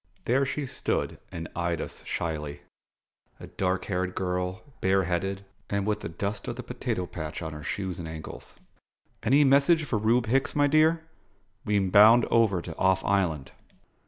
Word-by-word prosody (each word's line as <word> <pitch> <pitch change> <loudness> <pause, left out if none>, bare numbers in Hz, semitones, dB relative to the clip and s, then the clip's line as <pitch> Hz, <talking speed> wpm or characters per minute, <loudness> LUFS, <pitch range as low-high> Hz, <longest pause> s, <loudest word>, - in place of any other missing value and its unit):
There 135 +3 +2
she 145 +1 -3
stood - - -2
and 85 -1 -6
eyed 85 -1 -1
us - - -6
shyly: 75 -4 -4 0.8
a - - -8
dark 95 -1 -2
haired 90 -2 -2
girl, 90 +2 -2 0.2
bare 95 0 +3
headed, 95 +2 -2 0.2
and 100 -1 -1
with 105 0 0
the - - -6
dust 100 +5 -4
of - - -3
the - - -7
potato 90 - -3
patch 80 -1 -6
on 80 0 -5
her 75 - -8
shoes 95 +2 -4
and 85 - -5
ankles. 80 -1 -9 0.7
"Any 140 +6 +4
message 140 +4 +4
for 115 -6 -1
Reub 115 +3 +2
Hicks, 135 +4 +1
my 145 -1 +4
dear? 155 +3 +3 0.6
We'm 100 -3 +1
bound 110 +4 +7
over 105 -7 +3
to 80 - -7
Off 95 0 +2
Island." 85 -8 0
95 Hz, 165 wpm, -27 LUFS, 85-115 Hz, 0.8 s, bound